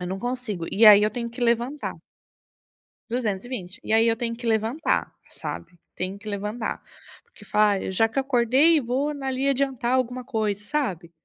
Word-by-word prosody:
Eu 180 - -4
não 190 +2 -4
consigo, 245 -8 -4
e 220 +3 +3
aí 210 -1 +9
eu 215 - +2
tenho 235 -2 -4
que 240 - -10
levantar. 240 +5 0 1.2
220. 215 -4 -3
E 220 - -2
aí 225 +1 +5
eu 230 - +3
tenho 230 0 -3
que 240 - -9
levantar, 225 +8 0 0.2
sabe. 175 -2 -8 0.2
Tenho 185 +2 -4
que 210 +1 -8
levantar 210 +3 -3 0.4
porque 470 - -18
fala: 210 0 +3
"Ai, 190 - -3
já 225 +4 +3
que 250 - -10
eu - - +2
acordei, 270 +5 +3
vou 265 +5 -1
na 275 -2 -6
ali 265 +1 -1
adiantar 270 -3 0
alguma 255 0 0
coisa", 215 -5 -2
sabe. 195 - -3
235 Hz, 180 wpm, -24 LUFS, 210-255 Hz, 1.2 s, aí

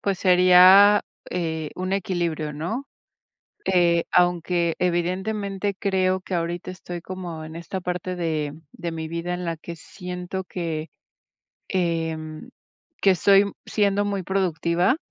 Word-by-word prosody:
pues, 195 -2 -1
sería, 185 +2 +7 0.3
eh, 160 -3 -3
un 185 +1 -3
equilibrio, 170 -5 -1
¿no?, 175 - -4 0.8
eh, 170 -2 +3
aunque, 175 -1 +2
evidentemente, 190 +3 -1
creo 190 -2 +1
que 185 - -5
ahorita 170 +1 -2
estoy 175 -2 -7
como 175 -4 -6
en 160 +1 -9
esta 180 +2 -5
parte 180 0 -3
de 155 -3 -2
de 170 -1 -5
mi 160 -1 -5
vida, 170 +2 -3
en 180 - -5
la 165 -1 -3
que 170 +1 -8
siento 180 +2 -6
que, 165 -3 -4 0.8
em, 165 +1 -2 0.5
que 195 -1 +5
soy 200 +3 +4
siendo 205 -1 +1
muy 200 -3 -2
productiva, 180 - +1
180 Hz, 125 wpm, -24 LUFS, 170-190 Hz, 0.8 s, sería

